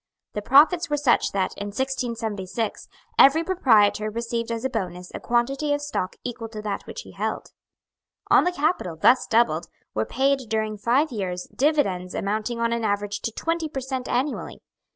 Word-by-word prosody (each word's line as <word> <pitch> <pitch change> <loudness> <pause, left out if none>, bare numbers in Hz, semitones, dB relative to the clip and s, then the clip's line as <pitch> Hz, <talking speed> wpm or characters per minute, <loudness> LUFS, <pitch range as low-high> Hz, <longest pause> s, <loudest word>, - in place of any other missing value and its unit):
The 210 - -3
profits 320 - +5
were 295 - +1
such 275 -5 +2
that, 190 -2 -1
in 205 - -4
1676, 225 -4 -3 0.3
every 305 +5 +7
proprietor 220 - +3
received 230 +1 -3
as 230 +2 -3
a - - +1
bonus 180 -5 -4
a - - -5
quantity 270 +5 +1
of 290 - -4
stock 190 -10 -3
equal 235 -2 -5
to 215 -1 -7
that 205 -2 -4
which - - -6
he - - -13
held. - - -4 0.8
On - - +7
the 360 - +1
capital, 300 - -1
thus 245 +10 +4
doubled, 200 -8 +2 0.3
were 110 - 0
paid, 270 -1 +1
during 215 -1 -1
five 260 +8 +2
years, 185 -5 -4
dividends 200 - +1
amounting 215 +4 -2
on 230 0 +1
an 235 -1 -2
average 205 -1 -1
to 230 - -2
twenty 330 +6 -2
per 275 - -4
cent. 260 -1 -4
annually. 265 +4 -2
235 Hz, 175 wpm, -24 LUFS, 205-275 Hz, 0.8 s, every